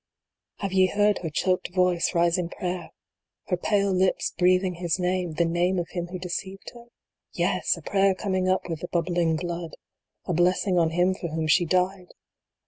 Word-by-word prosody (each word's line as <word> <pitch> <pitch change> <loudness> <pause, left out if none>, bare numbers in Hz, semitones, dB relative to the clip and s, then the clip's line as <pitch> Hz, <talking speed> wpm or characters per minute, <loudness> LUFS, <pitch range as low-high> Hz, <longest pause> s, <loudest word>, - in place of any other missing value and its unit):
Have 195 -2 -3
ye 190 -1 +5
heard 205 +1 +2
her 165 - -4
choked 180 +3 -1
voice 180 -1 +2
rise 170 +1 +3
in 170 -2 -2
prayer 180 -1 -4 0.6
her 180 - +2
pale 200 +1 +1
lips 185 0 +1
breathing 185 +1 +3
his 175 -1 0
name 180 -2 -1
the 170 +2 +1
name 175 +3 +1
of 175 -1 -2
him 175 -1 -4
who 180 +1 -6
de 180 0 -6
ceived 190 +2 -6
her? 235 -1 -13 0.5
Yes! - - 0
a - - -11
prayer 195 -1 +2
coming 185 -1 -1
up 185 - 0
with 165 -3 -4
the 175 - -5
bubbling 170 -1 0
blood 170 0 -5 0.5
a 180 - -1
blessing 180 +2 +2
on 165 -1 +3
him 175 +3 +2
for 185 - -5
whom 160 0 -3
she 165 +3 +3
died 185 +2 0
180 Hz, 190 wpm, -25 LUFS, 170-185 Hz, 0.6 s, ye